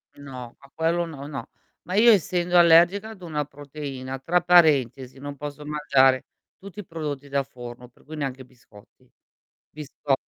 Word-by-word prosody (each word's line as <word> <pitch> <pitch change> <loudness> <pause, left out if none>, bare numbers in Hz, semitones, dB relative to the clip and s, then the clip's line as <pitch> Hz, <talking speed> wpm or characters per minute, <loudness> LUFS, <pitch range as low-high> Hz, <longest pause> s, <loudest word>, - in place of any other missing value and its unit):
No, 130 -4 -10
ma 140 0 -18
quello 170 +1 0
no, 140 -4 -9
no. 145 -2 -7 0.3
Ma 185 - -5
io 230 +2 +7
essendo 175 -2 +2
allergica 175 +5 +5
ad 205 -4 -12
una 150 -3 -3
proteina, 140 -2 -7
tra 175 +6 +1
parentesi, 135 -8 +3
non 145 +1 -7
posso 145 +1 -8
mangiare 135 -3 +3 0.3
tutti 200 +1 -11
i 200 - -7
prodotti 150 -4 -5
da 140 0 +1
forno, 125 -2 -11
per 125 - -26
cui 155 +1 -9
neanche 135 -3 -4
biscotti. 120 0 -21 0.6
Bisco 145 -1 -4
145 Hz, 160 wpm, -24 LUFS, 135-170 Hz, 0.6 s, io